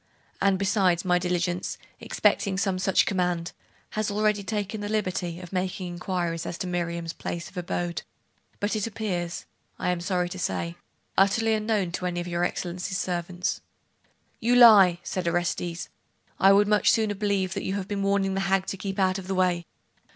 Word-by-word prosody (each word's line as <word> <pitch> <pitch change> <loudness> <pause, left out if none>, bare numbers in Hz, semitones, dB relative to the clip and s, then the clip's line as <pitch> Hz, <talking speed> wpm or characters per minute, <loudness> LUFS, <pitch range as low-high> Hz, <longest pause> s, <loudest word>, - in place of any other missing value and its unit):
And 195 -1 +3
besides, 190 -3 +2
my 180 -1 +3
diligence, 180 0 -1 0.2
expecting 195 -2 +1
some 195 -2 0
such 190 0 +3
command, 180 -3 0 0.4
has 215 -1 -1
already 210 0 +1
taken 205 +1 -3
the 205 - -4
liberty 185 -5 -1
of 180 0 -10
making 185 0 -2
inquiries 175 -1 -3
as 170 - -4
to - - -3
Miriam's 170 -2 -2
place 170 -1 -5
of - - -23
abode; 175 -1 -2 0.6
but 205 +2 0
it 215 0 -1
appears, 185 -6 -3 0.3
I 180 - 0
am 175 -1 -2
sorry 180 -1 0
to 185 - -7
say, 170 -1 -2 0.4
utterly 220 +3 +3
unknown 215 -4 0
to 180 +1 -2
any 175 -1 -2
of 175 - -4
your 175 0 -1
Excellency's 180 +1 -2
servants.' 175 0 -2 0.8
'You 240 +2 +2
lie!' 200 -8 +8
said 185 -2 -3
Orestes.... 175 0 -1 0.5
'I 195 - +7
would 200 +1 +5
much 210 0 +4
sooner 220 -2 +3
believe 195 -2 0
that 195 - -3
you 190 - -2
have 195 -2 -3
been 200 -1 -2
warning 195 -1 +1
the 195 - -1
hag 195 0 +1
to 195 - -4
keep 195 +1 -4
out 190 0 +2
of 185 - -9
the 190 - -1
way. 180 -2 +1
185 Hz, 180 wpm, -26 LUFS, 175-200 Hz, 0.8 s, lie